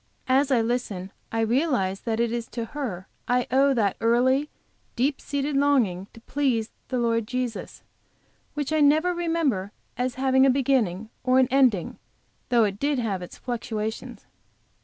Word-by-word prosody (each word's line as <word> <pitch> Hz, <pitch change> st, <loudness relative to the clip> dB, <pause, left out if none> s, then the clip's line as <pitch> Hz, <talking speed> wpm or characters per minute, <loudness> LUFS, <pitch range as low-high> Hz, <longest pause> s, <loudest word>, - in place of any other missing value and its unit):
As 270 Hz, +2 st, +3 dB
I 250 Hz, -4 st, +3 dB
listen, 225 Hz, -6 st, -2 dB, 0.2 s
I 225 Hz, -, 0 dB
realize 225 Hz, -, +1 dB
that 225 Hz, -1 st, -2 dB
it 235 Hz, -1 st, +1 dB
is 235 Hz, -1 st, -3 dB
to 235 Hz, -2 st, -5 dB
her 225 Hz, -10 st, -5 dB, 0.2 s
I 245 Hz, 0 st, +2 dB
owe 275 Hz, +2 st, +4 dB
that 205 Hz, -5 st, +1 dB
early, 260 Hz, +5 st, +2 dB, 0.5 s
deeply 265 Hz, +4 st, 0 dB
seated 285 Hz, 0 st, -2 dB
longing 245 Hz, -10 st, +2 dB
to 230 Hz, -, -14 dB
please 250 Hz, -4 st, -1 dB, 0.2 s
the 255 Hz, -, -2 dB
Lord 230 Hz, -2 st, 0 dB
Jesus, 250 Hz, -3 st, -4 dB, 0.7 s
which 295 Hz, 0 st, -2 dB
I 310 Hz, -, +2 dB
never 310 Hz, +5 st, +4 dB
remember 325 Hz, -, -1 dB, 0.3 s
as 250 Hz, 0 st, -1 dB
having 265 Hz, 0 st, +3 dB
a 270 Hz, -, +6 dB
beginning, 240 Hz, -6 st, +1 dB
or 255 Hz, 0 st, +3 dB
an 260 Hz, -1 st, +5 dB
ending, 255 Hz, -10 st, +2 dB, 0.5 s
though 240 Hz, -2 st, +4 dB
it 200 Hz, -1 st, -1 dB
did 285 Hz, 0 st, +1 dB
have 210 Hz, -6 st, -2 dB
its 180 Hz, -, -9 dB
fluctuations. 220 Hz, -3 st, -5 dB
250 Hz, 160 wpm, -25 LUFS, 225-275 Hz, 0.7 s, a